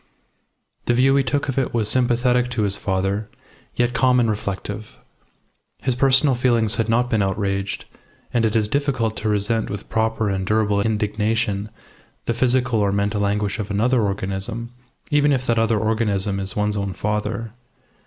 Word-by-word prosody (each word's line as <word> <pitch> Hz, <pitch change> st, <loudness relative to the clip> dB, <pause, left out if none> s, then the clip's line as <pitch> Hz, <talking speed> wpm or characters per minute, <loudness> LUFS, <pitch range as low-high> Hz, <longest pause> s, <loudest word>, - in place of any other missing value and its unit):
The 120 Hz, -, +3 dB
view 135 Hz, +2 st, +4 dB
he 140 Hz, -, +3 dB
took 140 Hz, +3 st, -1 dB
of 135 Hz, 0 st, 0 dB
it 130 Hz, -, -2 dB
was 110 Hz, -3 st, +1 dB
sympathetic 125 Hz, 0 st, +2 dB
to 115 Hz, -3 st, -1 dB
his 100 Hz, -1 st, 0 dB
father, 95 Hz, +1 st, -1 dB, 0.5 s
yet 120 Hz, 0 st, +1 dB
calm 125 Hz, 0 st, +3 dB
and 115 Hz, -2 st, +2 dB
reflective. 105 Hz, +1 st, -5 dB, 0.8 s
His 130 Hz, -, -1 dB
personal 135 Hz, +2 st, +3 dB
feelings 120 Hz, -3 st, +2 dB
had 115 Hz, -1 st, 0 dB
not 120 Hz, +2 st, +2 dB
been 115 Hz, -4 st, +1 dB
outraged, 100 Hz, 0 st, -2 dB, 0.5 s
and 120 Hz, -, +2 dB
it 110 Hz, 0 st, +1 dB
is 110 Hz, -2 st, +2 dB
difficult 130 Hz, -4 st, 0 dB
to 110 Hz, -, -2 dB
resent 105 Hz, +2 st, +1 dB
with 100 Hz, -1 st, -6 dB
proper 110 Hz, -1 st, 0 dB
and 95 Hz, -1 st, -1 dB
durable 105 Hz, 0 st, +1 dB
indignation 105 Hz, -1 st, -1 dB, 0.6 s
the 115 Hz, -, 0 dB
physical 125 Hz, -1 st, +2 dB
or 100 Hz, -1 st, +2 dB
mental 100 Hz, +1 st, 0 dB
anguish 105 Hz, +1 st, -1 dB
of 105 Hz, -1 st, -4 dB
another 115 Hz, +5 st, +2 dB
organism, 100 Hz, +4 st, -3 dB, 0.4 s
even 145 Hz, 0 st, +4 dB
if 130 Hz, -2 st, 0 dB
that 115 Hz, -2 st, +2 dB
other 115 Hz, 0 st, +2 dB
organism 105 Hz, -2 st, 0 dB
is 95 Hz, -1 st, -5 dB
one's 105 Hz, 0 st, 0 dB
own 100 Hz, -1 st, -2 dB
father. 105 Hz, +2 st, -3 dB
110 Hz, 165 wpm, -22 LUFS, 100-120 Hz, 0.8 s, view